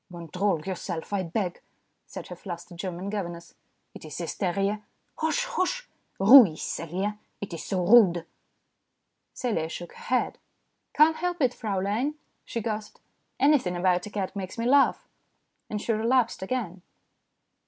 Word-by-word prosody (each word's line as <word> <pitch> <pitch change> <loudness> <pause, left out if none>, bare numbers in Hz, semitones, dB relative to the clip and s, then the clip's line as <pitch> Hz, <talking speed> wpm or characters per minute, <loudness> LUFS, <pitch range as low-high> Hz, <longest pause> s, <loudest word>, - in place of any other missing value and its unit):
"Control 175 +1 -1
yourself, 185 -1 -4
I 200 - +1
beg," 180 +1 -3 0.5
said - - -8
her 180 - -6
flustered 175 -1 -8
German 185 +1 -4
governess. 170 -5 -5 0.2
" - - -47
It - - -11
is 155 -2 -8
hysteria. 195 +4 -1 0.4
Hosh! 320 +11 +1
hosh! - - -1 0.3
Ruhig! 200 - +9
Celia! 190 +8 -3 0.2
It 200 -3 -6
is 165 - -5
so 185 -3 -1
rude." 180 -6 +6 1.1
Celia 185 -11 -1
shook 175 +1 -7
her - - -13
head. 250 0 0 0.3
" - - -50
Can't 315 +2 +6
help 355 0 -2
it, 255 -4 +2
Fraulein," 215 +7 -1 0.3
she 230 - -4
gasped. 215 -1 -4 0.2
" - - -48
Anything 270 -10 +3
about 180 +1 +1
a - - -7
cat 200 -1 -3
makes 190 +1 -5
me 230 - -2
laugh." 275 +3 +4 0.6
And 210 - -2
she 225 - -1
relapsed 230 0 +1
again. 190 -4 -3
200 Hz, 150 wpm, -27 LUFS, 175-240 Hz, 1.1 s, Ruhig